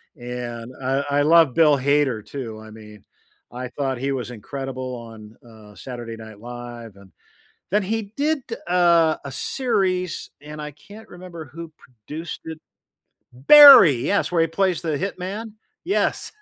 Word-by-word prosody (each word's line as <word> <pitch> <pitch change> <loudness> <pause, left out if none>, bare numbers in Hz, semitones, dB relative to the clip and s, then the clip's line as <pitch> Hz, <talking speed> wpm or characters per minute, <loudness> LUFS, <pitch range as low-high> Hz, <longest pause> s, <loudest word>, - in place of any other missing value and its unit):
And 120 -1 -7
I 135 +2 0 0.2
I - - +4
love 160 -4 +5
Bill 150 -3 +5
Hader 135 -5 0
too, 110 -2 -7
I 110 - -12
mean, 105 -2 -14 0.5
I 125 +1 -6
thought 135 -1 -3
he 135 +2 -2
was 125 -2 -4
incredible 130 +2 -6
on, 115 -2 -12
uh, 110 -2 -16
Saturday 120 -2 -8
Night 110 -2 -12
Live, 120 -2 -9
and 100 -1 -18 0.6
Then 210 0 +2
he 210 +1 -3
did, 305 +1 +1 0.3
uh, 170 -3 +3
a 140 - -7
series, 190 - -2
and 150 +1 -10
I 150 0 -6
can't 205 +10 -15
remember 175 -3 -10
who 160 +4 -10
produced 145 +8 -9
it 160 -1 -7 0.7
Barry, 200 - +9
yes, 200 - 0
where 170 - +2
he 165 - +1
plays 180 0 0
the 155 -3 -2
hitman? 200 +4 -5 0.3
Yes. 390 - -1
140 Hz, 150 wpm, -22 LUFS, 120-175 Hz, 0.7 s, Barry